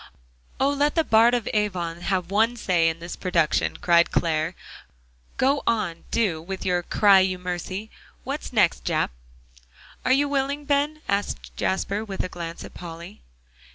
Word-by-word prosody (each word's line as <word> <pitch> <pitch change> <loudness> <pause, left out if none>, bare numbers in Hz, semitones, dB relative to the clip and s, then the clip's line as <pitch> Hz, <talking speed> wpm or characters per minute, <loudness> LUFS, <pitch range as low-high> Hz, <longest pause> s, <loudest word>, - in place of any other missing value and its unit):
"Oh! 270 - +3
let 285 +1 +1
the 325 - +3
Bard 230 -1 +5
of 240 -4 -2
Avon 180 -5 -1
have 185 -1 -1
one 225 +4 +3
say 175 -6 +2
in 160 - -4
this 170 +1 -7
production," 165 -4 +1
cried 170 -1 +4
Clare. 160 +1 0 0.8
"Go 275 +2 +2
on, 210 -8 -1
do, 185 -9 0
with 190 +3 -6
your 180 -1 +1
'cry 200 +2 +5
you 185 -1 +1
mercy.' 180 +4 -5 0.3
What's 275 +4 -5
next, 210 -8 +2
Jap?" - - 0 0.9
"Are 255 - +1
you 280 +2 +4
willing, 280 +1 -1
Ben?" 290 +2 0
asked 200 +1 -2
Jasper, 200 +2 -1
with 200 -3 -4
a - - -4
glance 170 -1 -7
at - - -11
Polly. 170 +3 -9
195 Hz, 155 wpm, -24 LUFS, 175-240 Hz, 0.9 s, Bard